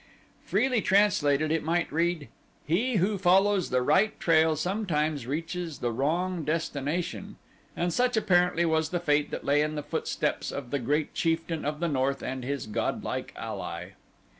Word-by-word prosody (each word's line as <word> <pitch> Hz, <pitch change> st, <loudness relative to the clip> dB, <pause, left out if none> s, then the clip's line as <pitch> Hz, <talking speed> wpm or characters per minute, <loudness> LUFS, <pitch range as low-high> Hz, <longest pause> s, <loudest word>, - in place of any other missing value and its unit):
Freely 255 Hz, -4 st, +1 dB
translated 155 Hz, -7 st, +3 dB
it 160 Hz, -, +1 dB
might 170 Hz, +2 st, 0 dB
read, 165 Hz, -1 st, 0 dB, 0.4 s
"He 225 Hz, +11 st, +1 dB
who 195 Hz, +1 st, +1 dB
follows 195 Hz, +1 st, +3 dB
the 125 Hz, 0 st, +1 dB
right 195 Hz, +11 st, +2 dB
trail 160 Hz, -1 st, +4 dB
sometimes 155 Hz, -, -1 dB
reaches 165 Hz, +2 st, -4 dB
the 120 Hz, -, -2 dB
wrong 165 Hz, +8 st, -1 dB
destination," 155 Hz, +1 st, -2 dB, 0.4 s
and 175 Hz, 0 st, 0 dB
such 250 Hz, -1 st, +1 dB
apparently 180 Hz, -4 st, +3 dB
was 160 Hz, -1 st, +1 dB
the 175 Hz, -, -1 dB
fate 150 Hz, -3 st, +1 dB
that -, -, -6 dB
lay 145 Hz, +1 st, +3 dB
in 155 Hz, 0 st, -1 dB
the 150 Hz, -, -3 dB
footsteps -, -, -2 dB
of 130 Hz, -4 st, -6 dB
the 140 Hz, -, 0 dB
great 145 Hz, +5 st, -1 dB
chieftain 165 Hz, -1 st, -1 dB
of 150 Hz, +1 st, -2 dB
the 170 Hz, -, 0 dB
north 135 Hz, -2 st, 0 dB
and 130 Hz, 0 st, -4 dB
his 140 Hz, +2 st, -3 dB
godlike 105 Hz, -, -3 dB
ally. -, -, -5 dB
160 Hz, 160 wpm, -28 LUFS, 145-180 Hz, 0.4 s, trail